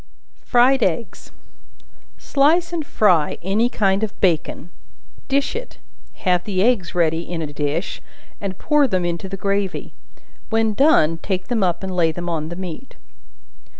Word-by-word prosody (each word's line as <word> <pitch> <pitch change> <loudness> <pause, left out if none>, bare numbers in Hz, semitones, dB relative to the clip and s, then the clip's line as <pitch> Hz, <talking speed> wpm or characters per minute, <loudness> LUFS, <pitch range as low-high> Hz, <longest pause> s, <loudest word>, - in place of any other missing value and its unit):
Fried 250 +2 +4
Eggs. 190 0 -2 0.9
Slice 330 +5 +2
and 330 -2 -1
fry 180 - +2
any 210 +6 +1
kind 195 -3 +1
of 215 - -4
bacon, 175 -1 0 0.6
dish 280 +5 0
it; 480 +2 -7 0.5
have 180 -1 +3
the 190 -2 0
eggs 215 -7 +1
ready 165 -2 +2
in 170 -1 -4
a 145 -1 -6
dish, 150 +4 -2 0.4
and 195 -2 -4
pour 295 -2 +3
them 185 -6 0
into 175 +2 -3
the 195 - -5
gravy; 200 0 -2 0.6
when 225 -1 +1
done, 165 - +4
take 185 -2 -3
them 235 -3 0
up 180 -1 0
and 190 -1 -4
lay 165 -2 +3
them 175 +2 -6
on 160 -2 -2
the 175 - -6
meat. 185 +7 -7
190 Hz, 150 wpm, -21 LUFS, 175-235 Hz, 0.9 s, Fried